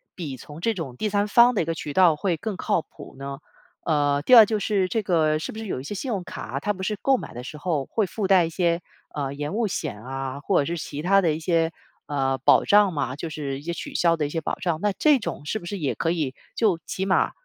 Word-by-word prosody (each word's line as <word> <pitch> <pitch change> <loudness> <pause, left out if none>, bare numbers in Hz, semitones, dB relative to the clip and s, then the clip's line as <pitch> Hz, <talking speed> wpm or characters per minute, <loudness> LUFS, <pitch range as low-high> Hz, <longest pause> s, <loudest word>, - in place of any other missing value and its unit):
比 150 -7 -5
从 150 +5 -11
这 225 +5 +1
种 140 - -6
第 215 - -1
3 205 +1 +1
方 240 +4 +6
的 - - +2
一 - - -1
个 165 0 -2
渠 150 -2 -5
道 180 -3 +5
会 170 +2 -1
更 205 +1 -4
靠 165 - 0
谱 - - -14
呢？ 140 0 -5 0.5
呃， 145 -3 +2
第 250 - +7
二 225 -2 +11
就 215 0 -1
是 200 -2 +1
这 225 - 0
个 155 -4 +2
是 - - -5
不 220 - -8
是 225 - -6
有 155 - -3
一 - - -10
些 205 +9 -5
信 260 - -4
用 200 -6 -2
卡， 135 -6 -6
它 205 +8 -1
不 190 - -9
是 210 +2 -1
购 270 -1 +3
买 - - -8
的 120 - -7
时 140 +4 -8
候 150 -4 -1
会 220 - 0
附 195 +2 -3
带 185 -3 +5
一 - - -4
些， 170 0 0 0.3
呃， 140 -2 -2
延 145 +5 -4
误 230 -1 +1
险 105 - -4
啊， 135 +1 -5
或 185 +2 +2
者 - - -2
是 170 +3 -3
其 145 0 -6
他 195 +4 +4
的 165 -4 +2
一 155 - -4
些， 165 0 +1 0.4
呃， 135 -2 0
保 130 - +5
障 205 -2 +5
嘛， 135 -4 -2
就 160 +3 -5
是 145 -3 -4
一 - - -12
些 170 - -3
取 - - -7
消 170 -1 +3
的 150 - 0
一 - - -7
些 165 +2 -3
保 - - -2
障。 170 -3 -2
那 210 - +2
这 300 -3 +5
种 205 -9 -5
是 220 - -2
不 175 - -12
是 195 +3 -4
也 145 -5 -1
可 165 - 0
以 150 -7 -2 0.2
就 205 -7 +2
起 190 - -3
码 190 -1 +2
170 Hz, 290 characters per minute, -24 LUFS, 145-200 Hz, 0.5 s, 二